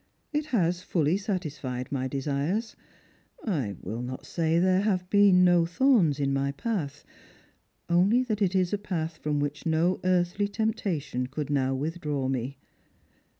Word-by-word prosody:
It 300 +1 -1
has 180 - +1
fully 165 -2 +1
satisfied 150 - -4
my 130 -2 -1
desires. 145 - -2 0.7
I 140 - -1
will 115 +2 -4
not 130 +3 -6
say 165 -1 0
there 185 +2 +3
have 190 -4 0
beeu 205 -1 +6
no 175 -2 +5
thorns 175 - +3
in 140 -1 +1
my 140 0 0
path, 150 - -3 0.8
only 190 +9 +4
that 215 -4 -3
it 190 -1 +2
is 185 0 +1
a 205 - 0
path 165 -5 -3
from 150 -1 -1
which 145 +2 -3
no 165 +3 +2
earthly 180 +2 +1
temptation 200 - -2
could 145 +2 -4
now 135 -2 +1
withdraw 150 -2 -2
me. 130 +1 -3
170 Hz, 150 wpm, -27 LUFS, 140-195 Hz, 0.8 s, beeu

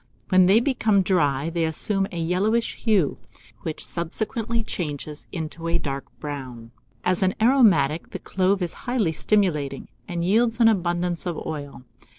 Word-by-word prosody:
When 185 -1 +5
they 200 +4 +6
become 225 -6 +2
dry, 155 -5 +1
they 170 0 0
assume 195 +5 0
a 175 - -6
yellowish 195 +8 +1
hue, 205 - +1 0.4
which 155 - -2
subsequently 220 +7 -2
changes 150 -6 -5
into 165 0 -5
a 165 +1 +2
dark 140 -4 -4
brown. 130 -6 -7 0.3
As 180 0 +1
an 190 -1 +2
aromatic, 215 - +4
the - - -5
clove 190 0 0
is 170 - -2 0.2
highly 230 -10 +1
stimulating, 155 -8 0 0.2
and 170 -1 -2
yields 225 +4 +2
an 230 -1 +7
abundance 175 -3 0
of 170 - -2
oil. 145 -4 -6
175 Hz, 150 wpm, -24 LUFS, 155-210 Hz, 0.4 s, an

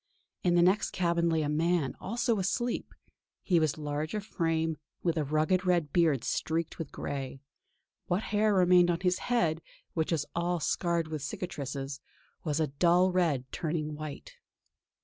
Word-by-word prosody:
In 175 -1 +2
the 175 - +5
next 185 +4 +3
cabin 170 -2 +1
lay 160 -1 +1
a - - -1
man, 160 -1 +1
also 230 +1 0
asleep. 240 +6 -2 0.5
He 175 -3 +3
was 155 -2 +1
large 150 +3 -3
of 210 -1 -3
frame, 165 -5 0 0.3
with 170 -2 +1
a 155 - +1
rugged 155 +6 +1
red 175 -5 +1
beard 155 -8 +3
streaked 165 +4 -2
with 160 -4 -5
grey; 135 -1 -5 0.7
what 185 +4 0
hair 210 +1 +3
remained 180 -1 +5
on 170 0 0
his 180 -1 +1
head, 170 -10 +1 0.3
which 160 0 -1
was 155 -3 +1
all 175 +1 0
scarred 170 +1 0
with 155 -2 -4
cicatrices, 140 -3 -4 0.4
was 150 -2 -1
a 160 - +3
dull 175 +6 +3
red 165 -8 +1
turning 155 -2 -2
white. 155 - -8
165 Hz, 160 wpm, -30 LUFS, 150-180 Hz, 0.7 s, the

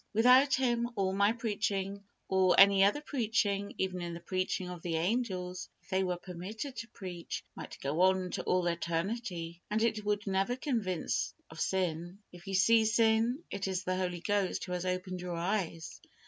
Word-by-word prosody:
Without 255 +5 +6
Him, 240 -2 +1
all 190 -2 0
my 200 +2 +4
preaching, 200 -4 -2 0.2
or 185 -1 +4
any 195 0 +8
other 205 +9 +3
preaching, 215 -7 0
even 180 -2 -2
the - - -7
preaching 185 +1 -2
of 180 -2 -7
the 165 -1 -2
angels, 185 -1 -1
if - - -25
they 190 0 +1
were 180 -1 -1
permitted 195 +9 -6
to 225 +1 -5
preach, 180 -6 -6
might - - -8
go 145 +5 0
on 185 -1 +3
to - - -2
all 180 -1 +1
eternity, 170 0 -2
and 215 +1 +1
it 220 -2 +1
would 205 0 -1
never 195 +4 +1
convince 225 - -1 0.2
of 160 - -7
sin. 175 -1 -1
If 175 +2 -14
you 195 - -2
see 220 +4 +5
sin, 225 +5 +2
it 195 0 -3
is 185 -1 -2
the 185 0 -1
Holy 180 -2 -2
Ghost 200 -1 0
who 180 - -8
has 180 0 -2
opened 185 0 -3
your 180 -1 -4
eyes. 170 -2 -2
190 Hz, 175 wpm, -32 LUFS, 180-220 Hz, 0.2 s, any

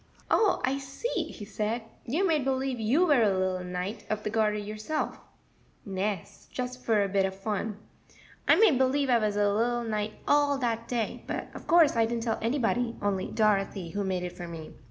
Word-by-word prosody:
"Oh, 420 -4 +3
I 270 +2 0
see," 275 - -3
he 205 - -9
said; 215 +3 -2 0.2
"you 320 +11 +1
made 315 -6 +2
believe 265 -1 -1
you 255 +11 +3
were 290 -7 +4
a 215 - +5
little 185 -1 0
Knight 180 +4 -4
of 215 0 -2
the 210 - -2
Garter 215 -1 +2
yourself." 215 +8 -3 0.7
"Nes; 195 -1 -4
just 250 0 -4
for 215 -3 +3
a - - 0
bit 195 0 +2
of 190 0 -1
fun, 210 +1 -3 0.7
I - - +7
made 395 - +5
believe 265 +1 +2
I 240 - +5
was 210 -2 0
a 205 -1 +2
little 240 +3 +1
knight 215 -1 -2
all 290 -1 +4
dat 230 -3 -1
day; 235 -3 -2
but - - -4
of - - -10
course 330 -5 +6
I 225 -1 +3
didn't 230 0 -2
tell 225 -2 -1
anybody, 235 0 0
only 200 -2 -1
Dorothy, 195 -4 +1
who 205 0 -2
made 185 -2 -1
it 180 - -5
for 175 - -7
me. 165 -2 -8
225 Hz, 195 wpm, -28 LUFS, 205-255 Hz, 0.7 s, I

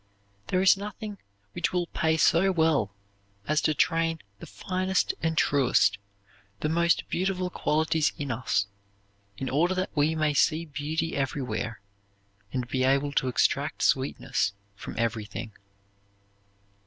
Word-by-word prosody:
There 185 0 +1
is 190 - +7
nothing 205 0 -7 0.3
which - - -1
will 180 -1 0
pay 160 -1 0
so 170 +4 +4
well 160 - +2 0.6
as 155 0 +2
to 155 - +1
train 165 0 +1 0.2
the - - -9
finest 185 - -1
and 160 0 -1
truest, 125 -8 +3 0.6
the 150 - 0
most 170 +1 +2
beautiful 185 0 -1
qualities 155 -1 +1
in 140 -2 -3
us 115 -4 0 0.7
in 135 - -4
order 170 +8 +2
that 185 -1 -3
we 150 +2 +2
may 155 -1 +1
see 155 +3 +2
beauty 155 +2 -3
everywhere 130 -5 -3 0.7
and 125 -2 -2
be 130 0 0
able 140 +2 +2
to 135 -2 +1
extract 125 - +1
sweetness 100 - +1 0.2
from - - -8
everything. 110 -2 -3
155 Hz, 130 wpm, -27 LUFS, 130-170 Hz, 0.7 s, is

